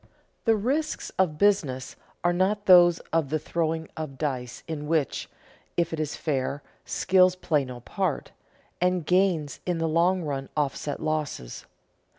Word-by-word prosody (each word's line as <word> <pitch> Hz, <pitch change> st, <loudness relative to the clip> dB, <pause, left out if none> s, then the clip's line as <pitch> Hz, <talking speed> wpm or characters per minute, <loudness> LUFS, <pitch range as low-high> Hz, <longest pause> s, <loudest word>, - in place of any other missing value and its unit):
The 225 Hz, -2 st, +5 dB
risks 275 Hz, +9 st, -1 dB
of 165 Hz, -5 st, +2 dB
business 150 Hz, -10 st, +1 dB, 0.3 s
are 175 Hz, 0 st, +3 dB
not 200 Hz, +3 st, +1 dB
those 175 Hz, -2 st, +7 dB, 0.2 s
of 160 Hz, -4 st, +2 dB
the 155 Hz, -, +1 dB
throwing 160 Hz, +1 st, -2 dB
of 155 Hz, -4 st, -6 dB
dice 125 Hz, -4 st, -3 dB
in 150 Hz, -2 st, -4 dB
which 155 Hz, -4 st, 0 dB, 0.5 s
(if 170 Hz, -1 st, +1 dB
it 160 Hz, -, -3 dB
is 155 Hz, -1 st, -2 dB
fair) 140 Hz, -1 st, -2 dB, 0.2 s
skill 185 Hz, -1 st, +4 dB
plays 165 Hz, -6 st, 0 dB
no 125 Hz, -1 st, -8 dB
part, 185 Hz, -, -2 dB, 0.5 s
and 180 Hz, -2 st, +1 dB
gains 180 Hz, -5 st, +1 dB
in 180 Hz, -2 st, -1 dB
the 165 Hz, 0 st, 0 dB
long 175 Hz, +3 st, +2 dB
run 135 Hz, -3 st, -3 dB
offset 145 Hz, 0 st, -2 dB
losses. 155 Hz, -, -3 dB
160 Hz, 150 wpm, -26 LUFS, 145-180 Hz, 0.5 s, those